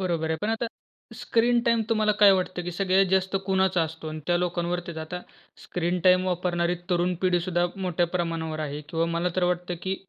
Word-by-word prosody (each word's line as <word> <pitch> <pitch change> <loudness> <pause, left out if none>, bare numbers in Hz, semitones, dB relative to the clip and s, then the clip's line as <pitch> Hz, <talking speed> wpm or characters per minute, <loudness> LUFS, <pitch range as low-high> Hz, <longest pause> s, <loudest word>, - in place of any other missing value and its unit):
बरोबर 170 -4 -1
आहे. 160 - +1
पण 210 - 0
आता 225 +1 -1 0.5
स्क्रीन 235 +1 +2
टाईम 230 -1 +3
तुम्हाला 215 -2 +2
काय 205 -1 +6
वाटतं, 185 -1 -1
की 175 - -4
सगळ्यात 190 +1 +2
जास्त 190 0 +2
कुणाचा 190 -2 +2
असतो 160 0 -5
आणि 155 0 -6
त्या 175 -1 +3
लोकांवरती 175 -1 -2
आता 180 +3 -5 0.4
स्क्रीन 175 +1 -2
टाईम 185 0 +5
वापरणारी 175 -1 0 0.2
तरुण 180 +1 +1
पिढी 180 -2 +3
सुद्धा 175 0 0
मोठ्या 180 -2 0
प्रमाणावर 165 -2 -3
आहे. 150 -1 -4
किंवा 165 +1 0
मला 170 +2 0
तर 185 - +2
वाटतं, 180 0 -1
की 190 0 -1
180 Hz, 190 wpm, -26 LUFS, 170-190 Hz, 0.5 s, काय